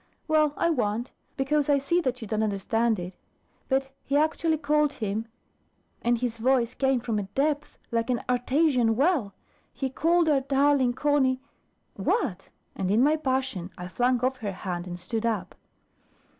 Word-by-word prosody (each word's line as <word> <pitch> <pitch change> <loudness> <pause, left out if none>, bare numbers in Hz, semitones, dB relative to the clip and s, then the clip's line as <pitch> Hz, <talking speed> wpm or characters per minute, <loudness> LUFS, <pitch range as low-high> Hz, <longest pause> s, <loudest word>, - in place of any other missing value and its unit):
"Well, 305 -2 +3
I 335 - +2
won't; 235 -3 -1 0.3
because 290 +2 +1
I 285 - +5
see 340 +6 +1
that 255 -5 -2
you - - -6
don't 215 +1 -1
understand 220 +2 +1
it. 180 +1 -6 0.5
But 270 0 0
he 280 - +1
actually 315 +1 +1
called 300 0 +2
him 215 +1 -3 0.7
and 240 0 +2
his 230 -1 -3
voice 245 -1 +2
came 265 -2 +1
from 225 -3 -1
a 195 -1 -5
depth, 295 +1 0
like 230 +1 0
an 245 -2 0
Artesian 250 -1 +2
well 270 - +1 0.4
he 265 -2 -3
called 335 +4 +2
our 290 -3 +3
darling 275 -2 +3
Conny 270 -2 +2 0.3
" - - -45 0.2
"What?" 195 - -2 0.3
And 190 -1 -2
in 220 +5 +4
my 300 +2 +4
passion, 260 - -2
I 180 - -6
flung 245 +5 +1
off 260 0 0
her 205 -5 -4
hand, 180 -1 -5
and 175 0 -6
stood 220 +5 -3
up. 230 -2 -1
255 Hz, 170 wpm, -27 LUFS, 225-290 Hz, 0.7 s, I